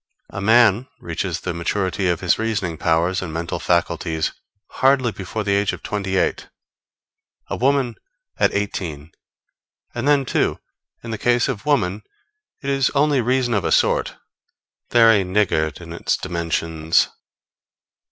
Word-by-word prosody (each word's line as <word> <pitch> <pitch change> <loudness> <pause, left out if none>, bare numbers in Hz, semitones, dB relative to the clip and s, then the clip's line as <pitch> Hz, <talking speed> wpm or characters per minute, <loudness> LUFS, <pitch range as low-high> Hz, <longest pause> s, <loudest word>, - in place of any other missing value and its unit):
A - - -5
man 115 +2 +4
reaches - - -3
the - - -3
maturity 95 +2 -1
of 85 - -1
his 90 +1 +2
reasoning 100 -7 -1
powers 85 +3 +1
and 90 -3 -5
mental 85 +1 -3
faculties 80 -1 0 0.5
hardly 130 -2 +3
before 100 +2 -5
the 100 -1 0
age 100 0 +1
of - - -8
twenty 100 -2 -2
eight; - - -1 1.0
a - - 0
woman 135 -1 +1 0.5
at - - +3
eighteen. 85 -7 -4 0.8
And 120 +3 -3
then, 145 -2 +4
too, - - 0 0.5
in 115 - -6
the 110 - -4
case 120 +1 +2
of 135 0 -4
woman, 105 -9 +1 0.6
it 140 - -1
is 135 -1 +2
only 140 -1 +3
reason 125 0 +1
of 105 -5 +1
a - - -1
sort - - +2 0.7
very 115 -4 +5
niggard 90 -5 0
in 85 -1 -9
its 85 - -1
dimensions. 85 -2 0
100 Hz, 140 wpm, -21 LUFS, 85-120 Hz, 1.0 s, very